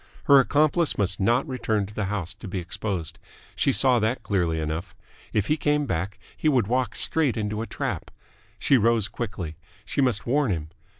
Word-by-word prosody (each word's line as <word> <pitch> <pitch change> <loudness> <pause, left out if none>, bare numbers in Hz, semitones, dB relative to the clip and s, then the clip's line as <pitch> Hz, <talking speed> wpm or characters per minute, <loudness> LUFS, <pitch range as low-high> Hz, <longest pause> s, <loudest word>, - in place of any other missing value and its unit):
Her 140 -1 +7
accomplice 150 - +2
must 95 -2 0
not 120 +9 +2
return 110 -6 -1
to 105 - -11
the 105 -1 -2
house 95 -3 -3
to 110 - -10
be 95 - -4
exposed. 95 -1 -4 0.4
She 140 - +2
saw 130 -2 +4
that 110 +4 -1
clearly 85 -5 0
enough. 80 +3 -4 0.4
If 105 -2 +1
he 150 +6 +1
came 150 -1 +1
back, 95 -3 -2 0.2
he 155 - +1
would 125 -7 +3
walk 125 +1 0
straight 145 -8 +1
into 105 0 -2
a 115 - -4
trap. - - -4 0.5
She 135 - +3
rose 115 -1 +3
quickly. 95 -8 -5 0.3
She 140 - -1
must 125 -6 +1
warn 140 +1 +2
him. 80 -5 -2
110 Hz, 185 wpm, -25 LUFS, 95-130 Hz, 0.5 s, Her